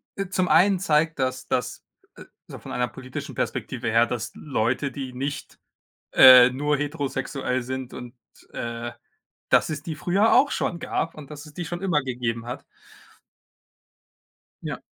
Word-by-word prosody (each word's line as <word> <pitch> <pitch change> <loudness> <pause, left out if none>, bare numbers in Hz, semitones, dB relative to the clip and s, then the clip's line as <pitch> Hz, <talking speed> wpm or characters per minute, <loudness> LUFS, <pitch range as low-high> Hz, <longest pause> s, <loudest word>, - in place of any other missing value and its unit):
e 195 -2 -4
zum 185 -1 0
einen 185 +3 +4
zeigt 160 -3 +1
das, 130 0 -2
dass 125 - -2 0.3
äh, - - -11 0.2
so - - -9
von - - -10
einer 125 0 0
politischen 130 -1 -8
Perspektive - - -3
her, 115 +1 +4
dass 120 -2 -4
Leute, 135 0 -1
die 130 -2 -6
nicht, 140 +2 -5 0.5
äh, 125 -1 +9
nur 145 +3 0
heterosexuell 135 -3 -2
sind 130 0 -5
und, 120 0 -9 0.4
äh, 115 0 -5 0.6
dass - - +4
es 155 -2 -4
die 160 -1 -5
früher 190 +8 +2
auch 275 +3 +5
schon 170 - -2
gab 165 0 -2
und, 150 -3 -11
dass 145 +1 -9
es 150 - -14
die 175 +2 -5
schon 175 +3 -5
immer 180 -6 +1
gegeben 120 -3 -3
hat. 125 - -6 2.0
Ja. - - -5
135 Hz, 155 wpm, -24 LUFS, 125-160 Hz, 2.0 s, äh